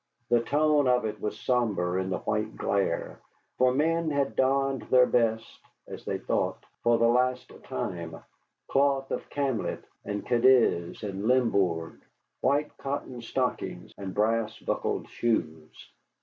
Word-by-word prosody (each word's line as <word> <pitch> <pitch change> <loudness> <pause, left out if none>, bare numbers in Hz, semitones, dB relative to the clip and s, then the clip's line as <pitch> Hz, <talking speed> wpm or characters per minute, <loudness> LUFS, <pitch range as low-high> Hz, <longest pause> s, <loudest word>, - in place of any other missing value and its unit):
The 120 -1 +4
tone 145 +2 +2
of 125 -2 +3
it 110 - -4
was 105 - -3
sombre 100 -8 0
in 95 - -3
the 95 - -1
white 105 0 -2
glare, 100 -4 -1 0.4
for 130 0 +5
men 160 +4 +1
had 140 -2 0
donned 135 -1 +2
their 125 -1 +6
best 115 -2 0 0.3
(as - - -9
they - - -1
thought) - - -2 0.2
for 120 0 +3
the 115 - +4
last 125 +1 +1
time, 90 -11 -4 0.5
cloth 135 -1 +1
of - - -4
camlet 140 -5 -2 0.2
and 105 0 -4
Cadiz 120 -9 +3
and 100 0 -4
Limbourg, 100 -10 +1 0.4
white 145 +3 +1
cotton 135 -3 -4
stockings, 115 - -3
and 95 -1 -6
brass 110 +2 0
buckled - - -2
shoes. 80 -9 -3
120 Hz, 135 wpm, -28 LUFS, 105-135 Hz, 0.5 s, their